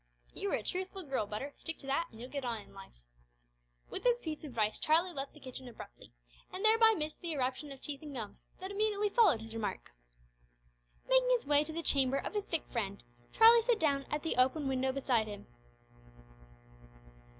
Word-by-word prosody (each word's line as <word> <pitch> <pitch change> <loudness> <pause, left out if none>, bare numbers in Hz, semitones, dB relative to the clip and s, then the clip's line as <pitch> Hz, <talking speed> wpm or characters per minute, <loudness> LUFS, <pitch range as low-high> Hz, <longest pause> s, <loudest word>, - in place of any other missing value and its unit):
"You 400 - -3
are - - +2
a - - -4
truthful 375 +1 -3
girl, 265 -8 -2
Butter 215 +8 -4
stick 325 - -5
to - - -13
that, 275 +5 0
and 220 - -15
you'll 250 +2 -9
get 280 -2 -4
on 235 -3 -2
in - - -15
life." 195 - -14 0.9
With - - -3
this 485 -1 +3
piece 315 -7 -5
of - - -6
advice 225 -6 -1
Charlie 335 +4 +3
left 275 0 -5
the - - -13
kitchen 260 -1 -8
abruptly, 145 - -12 0.4
and 385 +4 -3
thereby 445 0 +6
missed 305 0 -3
the 340 -2 -3
eruption 265 +1 -2
of 270 - -10
teeth 280 -2 -5
and 295 -3 -8
gums 220 -4 -6 0.2
that 380 +1 -6
immediately 415 0 +1
followed 395 - +4
his 225 0 -9
remark. 220 - -4 1.2
Making - - +4
his - - +2
way 290 +1 +5
to 310 - -5
the 335 +1 -4
chamber 270 -2 +4
of - - -4
his 415 -1 -2
sick 330 - -1
friend, 200 - -3 0.3
Charlie 460 +1 +7
sat 470 0 +2
down 280 -5 +1
at 300 - -2
the 325 - -2
open 265 +3 +3
window 265 0 0
beside 255 -5 +1
him. 205 -1 -8
290 Hz, 200 wpm, -33 LUFS, 255-375 Hz, 1.2 s, Charlie